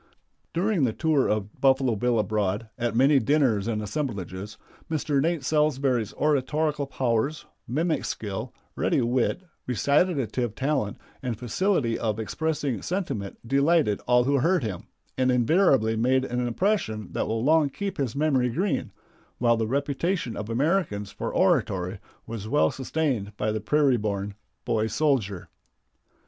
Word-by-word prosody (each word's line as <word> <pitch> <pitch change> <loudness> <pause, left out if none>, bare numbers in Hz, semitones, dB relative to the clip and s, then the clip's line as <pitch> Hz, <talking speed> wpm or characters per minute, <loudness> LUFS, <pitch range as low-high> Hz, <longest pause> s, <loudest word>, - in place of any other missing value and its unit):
During 185 -1 +1
the 120 -4 +2
tour 155 -2 +2
of 105 -1 -3
Buffalo 130 -3 +3
Bill 120 +3 +1
abroad, 105 0 -1
at 120 -2 -2
many 135 +3 +5
dinners 125 -5 +2
and 110 -2 -1
assemblages 105 - -4 0.3
Mr. 150 -3 0
Nate 165 -1 0
Salsbury's 135 -7 +1
oratorical 150 0 0
powers, 130 +3 -1 0.2
mimic 155 +5 0
skill, 110 +3 -4 0.2
ready - - +1
wit, 125 +9 0 0.2
recitative 130 - +1
talent, 135 -7 -1 0.2
and 125 -5 -3
facility 125 - 0
of 110 -2 -1
expressing 145 -1 -2
sentiment 165 - -3
delighted 140 -4 +2
all 125 0 +5
who 140 +2 +2
heard 170 +3 +2
him, 100 -6 -5 0.3
and 130 0 +3
invariably 125 - +3
made 130 +3 +2
an 125 -1 -1
impression 120 - -1
that - - -2
will 110 +1 -1
long 155 +1 +4
keep 195 +5 -5
his 130 -4 -1
memory 140 -4 +2
green, 185 - -1 0.5
while 120 -1 +3
the 110 -1 -1
reputation 140 - -1
of 105 +2 -5
Americans 120 - 0
for - - -4
oratory 95 +1 +1 0.3
was 110 -2 -6
well 145 +4 +3
sustained 130 -7 -2
by 105 +1 0
the 110 0 -2
prairie 140 +2 +3
born 100 -2 -3 0.3
boy 110 -1 +1
soldier. 110 - 0
125 Hz, 140 wpm, -26 LUFS, 110-150 Hz, 0.5 s, many